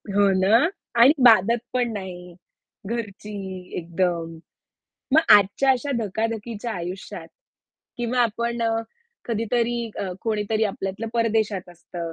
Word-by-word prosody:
हो 200 -1 +4
ना? 200 +4 +5 0.4
आणि 265 +5 +8
बाधत 230 0 +6 0.2
पण 245 -2 0
नाही. 180 -3 -7 0.5
घरची 210 -2 -5 0.5
एकदम. 170 -1 -2 0.8
मग 315 - +7 0.2
आजच्या 205 +7 +2
अशा 265 +2 0
धकाधकीच्या 225 +1 -3
आयुष्यात 180 -1 -6 0.7
किंवा 240 +1 0
आपण 235 +1 -1
अ, 230 - +2 0.6
कधीतरी 235 +1 0 0.2
अ, 190 - -3
कोणीतरी 215 0 0
आपल्यातलं 195 +2 -4
परदेशात 220 -5 0
असतं, 170 -1 -7
215 Hz, 110 wpm, -23 LUFS, 190-235 Hz, 0.8 s, आणि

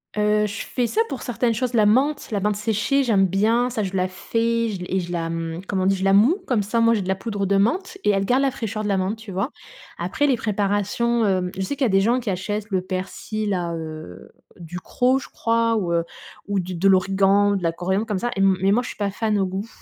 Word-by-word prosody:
Heu, 210 0 +2
je 210 +1 -4
fais 245 - -1
ça 430 - +1
pour 270 -4 -5
certaines 240 -1 0
choses, 250 +2 -2
la 215 -3 +4
menthe, 280 +6 +2
la 205 - 0
menthe 210 +1 0
séchée, 220 +6 +1
j'aime 205 -6 +3
bien, 225 +6 +2
ça. 225 -3 -2
Je 190 -1 -3
la 185 0 +1
fais 230 +4 -1
je 190 -4 -5
et 190 - 0
je 175 -1 -5
la, 165 -1 -2
mmh 165 0 -4
comme 190 -2 -1
on 185 - +1
dit, 195 - +3
je 190 - -4
la 195 0 +3
mouds, 235 - +5
comme 240 -5 +1
ça 210 +4 -2
au 230 - +4
moins 230 0 +5
j'ai 215 - 0
de 185 - -6
la 190 - +1
poudre 200 -1 -3
de 200 +1 +2
menthe 365 - 0
et - - +4
elle 195 -1 +1
garde 255 +6 +2
la 270 - +2
fraîcheur 220 -3 -4
de 210 - -2
la 200 - +2
menthe, 190 +4 -1
tu 220 -3 -10
vois? 195 +9 -2 0.5
Après, 290 - 0
les 270 - +3
préparations, 210 +3 0
hem, 185 -2 +1
je 190 - -4
sais 190 +9 -2
qu'il 275 - +1
y - - +3
a - - -1
des 195 0 +3
gens 235 +5 +2
qui 235 -4 -4
achètent 205 +3 -3
le 190 -3 0
persil 190 +3 -4
là, 175 -3 -1
heu, 155 - -8 0.3
Ducros, 180 +10 0
je 270 - -7
crois, 230 0 +1
ou, 180 -5 -1
heu, 170 - +2 0.4
ou 200 -1 0
du 180 0 -4
de 190 +4 +2
l'origan, 195 +2 +3
de 190 - -3
la 165 - +2
coriandre 190 +5 -1
comme 210 -4 -2
ça 240 - -1
et - - -4
m 195 -1 +4
mais 195 +1 +3
moi, 240 +5 +2
je - - -6
suis - - -9
pas 205 -1 -1
fan 210 +1 -1
au 190 - +1
goût. 190 +4 -4
205 Hz, 270 wpm, -22 LUFS, 190-230 Hz, 0.5 s, mouds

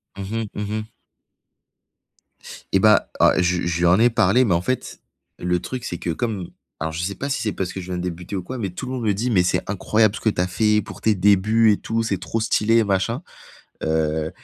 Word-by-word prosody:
Mmh 100 +3 -5 0.2
mh, - - -6
mmh 105 0 -4
mh. 110 - -7 1.9
Et 95 - +5
bah, 105 +1 +4
oh - - +7
je 90 0 +2
lui 85 - -2
je 85 -1 -1
lui 85 - +2
en 90 +4 +5
ai 120 +1 +5
parlé, 115 +2 +3
mais 100 -7 +2
en 85 - +1
fait, 130 +6 -3 0.4
le 90 0 0
truc 125 +5 -6
c'est 85 - -4
que 85 - -4
comme 95 0 -3 0.3
alors 80 +1 -2
je 85 +2 -4
sais 100 +3 -3
pas 140 - -4
si 140 - -1
c'est 105 - -1
parce 95 -2 -3
que 95 - -6
je 90 - -7
viens 90 -1 -3
de - - -3
débuter 90 +2 -5
ou 90 - -3
quoi, 130 +7 -6
mais 100 -5 -3
tout 125 +8 -7
le - - -5
monde 125 -3 -3
me 105 -2 +2
dit: 120 +6 -1
«Mais 95 -4 +4
c'est 90 - +1
incroyable 105 +1 +2
ce - - -5
que 110 - +2
tu 90 - -1
as 90 - +1
fait 105 +3 +2
pour - - -10
tes 110 -2 +2
débuts 105 +3 +4
et 100 - +2
tout, 115 0 -2
c'est 115 - -1
trop 115 - -3
stylé 115 +1 +2
et 115 - +4
machin», 105 - 0 0.6
heu 80 0 0
100 Hz, 255 wpm, -22 LUFS, 90-115 Hz, 1.9 s, oh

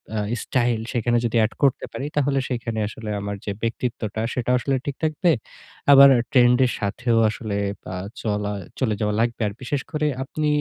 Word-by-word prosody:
আ - - -1 0.3
style 120 -3 +1
সেখানে 120 0 +1
যদি 115 0 -1
add 115 - -4
করতে 135 -2 +2
পারি 140 - -5
তাহলে 140 -1 +2
সেখানে 115 -3 -3
আসলে 110 0 -7
আমার 100 0 -4
যে 100 - -2
ব্যক্তিত্বটা 115 -2 -3
সেটাও 125 0 +1
আসলে 135 +1 0
ঠিক 140 -2 -3
থাকবে। 160 +2 +2 0.6
আবার 140 0 +10 0.2
trend 125 -1 +5
এর 125 - 0
সাথেও 115 +3 0
আসলে 105 -2 -4 0.4
আ - - -4 0.3
চলা, 105 -1 -1 0.3
চলে 115 -5 +1
যাওয়া 105 -1 0
লাগবে। 115 0 0
আর 100 - -4
বিশেষ 140 +2 -2
করে 150 0 0 0.2
আপনি 150 +3 -2
120 Hz, 175 wpm, -23 LUFS, 110-135 Hz, 0.6 s, আবার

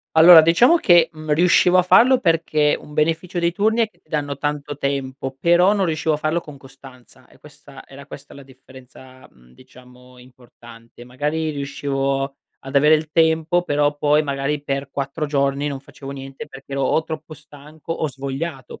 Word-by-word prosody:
Allora, 165 +1 +9
diciamo 205 - +4
che, 170 - +4
mhmm, 155 -1 -5
riuscivo 180 +2 +3
a - - +5
farlo 250 +8 +5
perché, 160 -6 +1
un 150 - -14
beneficio 165 +4 -1
dei 170 0 0
turni 220 +5 0
è 220 - -1
che 175 - -34
ti - - -39
danno 145 -2 -3
tanto 145 -1 -4
tempo, 135 -1 -4
però 175 +6 +3
non 195 -2 0
riuscivo 160 -1 -1
a - - -1
farlo 155 +3 -2
con 150 -3 -13
costanza; 135 -2 -17
è - - -22
questa - - -16
era - - -14
questa - - -12
la 140 - -12
differenza, 130 0 -17
mhmm, 60 -1 -24
diciamo, 125 - -19
importante. 120 -2 -17
Magari, 150 +5 -3
riuscivo 140 -1 -3 0.2
ad 135 +1 -11
avere 150 +3 +5
il 155 0 -2
tempo 160 +2 +2
però, 145 -2 0
poi, 150 +1 +2
magari, 140 0 -3
per 140 -1 -3
4 140 +3 -4
giorni 140 0 -1
non 140 -2 -5
facevo 135 0 -12
niente 135 -1 -9
perché 135 +1 -13
ero 140 0 -2
o 160 +4 0
troppo 155 0 -8
stanco, 150 +2 -11
o 160 -1 -3
svogliato. 135 0 -7
145 Hz, 180 wpm, -20 LUFS, 135-160 Hz, 0.2 s, Allora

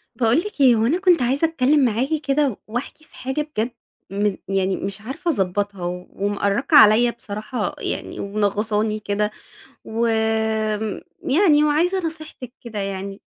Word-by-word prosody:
باقول 235 +1 +2
لِك 385 -4 -5
إيه 255 -3 +7
هو 220 0 +2
أنا 315 +10 +1
كنت 365 -5 +4
عايزة 270 +6 +2
أتكلم 290 -2 +3
معاكِ 240 +3 0
كده 275 -4 +1
واحكي 245 +7 -5
في - - -22
حاجة 265 +3 -2
بجد 255 -6 -3 0.4
مم 200 0 0
يعني 195 0 0
مش 195 +1 -5
عارفة 275 +10 -2
أضبّطها 200 - -2 0.3
ومأرّقة 205 +8 +1
عليَّ 235 -1 +7
بصراحة 215 +1 -5
يعني، - - -4
ومنغّصاني 210 +1 0
كده 210 0 -1 0.5
وآمم 220 -2 0 0.2
يعني 300 0 +4
وعايزة 340 +5 +1
نصيحتِك 310 -6 -7
كده 225 -3 -6
يعني. 195 0 -4
225 Hz, 140 wpm, -22 LUFS, 205-285 Hz, 0.5 s, إيه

